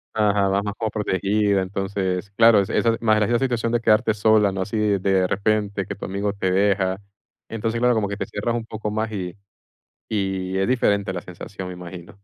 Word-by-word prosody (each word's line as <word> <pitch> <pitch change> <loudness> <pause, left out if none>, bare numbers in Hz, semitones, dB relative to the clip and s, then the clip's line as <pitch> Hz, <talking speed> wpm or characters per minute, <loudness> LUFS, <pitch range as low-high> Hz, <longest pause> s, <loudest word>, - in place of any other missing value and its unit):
Ajá, 105 -2 +2
vas 100 +1 +1
más 105 -1 -3
como 110 -2 -1
protegida. 100 0 +1
Entonces, 95 0 -3
claro, 115 0 +6
esa 95 - -4
esa 115 -1 +2
más 110 -2 +3
la 115 +3 +2
situación 120 -3 0
de 120 - +2
quedarte 110 0 +3
sola, 105 -1 +3
¿no? 95 - -3
Así 105 +3 -3 0.2
de 95 -1 +1
repente 100 0 0
que - - -6
tu - - -7
amigo 100 +1 -2
te 95 -2 -1
deja. 95 -1 +2 0.5
Entonces, 115 +1 -2
claro, 125 0 +3
como 110 -3 0
que 100 0 -5
te - - -3
cierras 115 +3 -3
un 115 -1 -3
poco 110 -1 -5
más 110 +1 -2
y 90 -4 -5 0.8
y 95 -2 -1
es 95 - +1
diferente 100 -6 +1
la 90 - -4
sensación, 90 +1 -8
imagino. 90 -1 -9
100 Hz, 195 wpm, -22 LUFS, 95-110 Hz, 0.8 s, claro